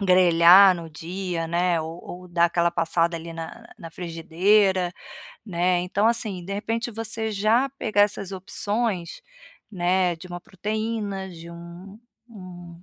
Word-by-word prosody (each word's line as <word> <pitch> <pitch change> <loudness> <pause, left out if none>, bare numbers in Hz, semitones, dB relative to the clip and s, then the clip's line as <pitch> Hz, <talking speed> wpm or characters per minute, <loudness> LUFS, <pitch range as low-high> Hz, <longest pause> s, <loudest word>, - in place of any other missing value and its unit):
grelhar 185 0 +7
no 165 -1 -8
dia, 170 +1 -4
né, 170 -1 +1
ou 160 +2 -7
ou 180 0 -9
dar 170 0 +3
aquela 170 0 +1
passada 165 0 +1
ali 165 +1 -8
na 165 +8 -8
na 165 -3 -9
frigideira, 180 +2 +1 0.5
né. 180 -1 +1
Então, 195 +4 0
assim, 215 -6 -2
de 195 - -6
repente, 230 +3 -3
você 225 0 -3
já 220 +6 +2
pegar 210 -2 0
essas 200 -2 -1
opções, 195 -1 -3 0.5
né, 180 -1 +1
de 175 - -11
uma 175 0 -7
proteína, 210 0 -4
de 170 -1 -11
um 170 +3 -11 0.3
um 175 -5 -12
180 Hz, 140 wpm, -24 LUFS, 170-205 Hz, 0.5 s, grelhar